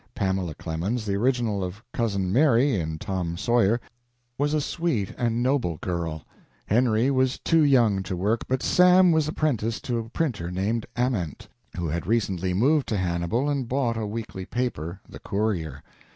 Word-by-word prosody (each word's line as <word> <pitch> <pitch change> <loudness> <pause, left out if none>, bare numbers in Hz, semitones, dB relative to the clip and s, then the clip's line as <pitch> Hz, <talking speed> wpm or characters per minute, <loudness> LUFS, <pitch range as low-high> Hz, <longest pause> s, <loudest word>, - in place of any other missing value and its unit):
Pamela 95 -5 -1
Clemens, 95 - -3
the 100 - -1
original 115 -2 +1
of 90 +3 -5
Cousin 100 -5 -1
Mary, 135 0 +4
in 80 -6 -2
"Tom 90 -3 -3
Sawyer," 120 0 +2 0.6
was 145 +3 0
a - - +2
sweet 145 - -1
and 120 0 0
noble 125 - +1
girl. 85 -4 -3 0.4
Henry 120 +3 +2
was 130 -1 +1
too 165 -1 +2
young 120 -9 +4
to 95 -1 -4
work, 105 +6 0
but 130 0 -1
Sam 180 0 +6
was 160 -2 +2
apprenticed 120 -9 -1
to 120 -2 -1
a 115 0 -6
printer 115 - -2
named 100 +5 -1
Ament, 120 - -1 0.3
who 85 - -2
had 85 +2 -3
recently 95 -5 0
moved 135 +10 +2
to 105 - -1
Hannibal 90 +8 0
and 140 -4 -1
bought 125 -2 0
a 110 -1 -3
weekly 105 -3 -6
paper, 95 -8 -3
"The - - -11
Courier." 90 -9 -2
110 Hz, 165 wpm, -25 LUFS, 95-130 Hz, 0.6 s, Sam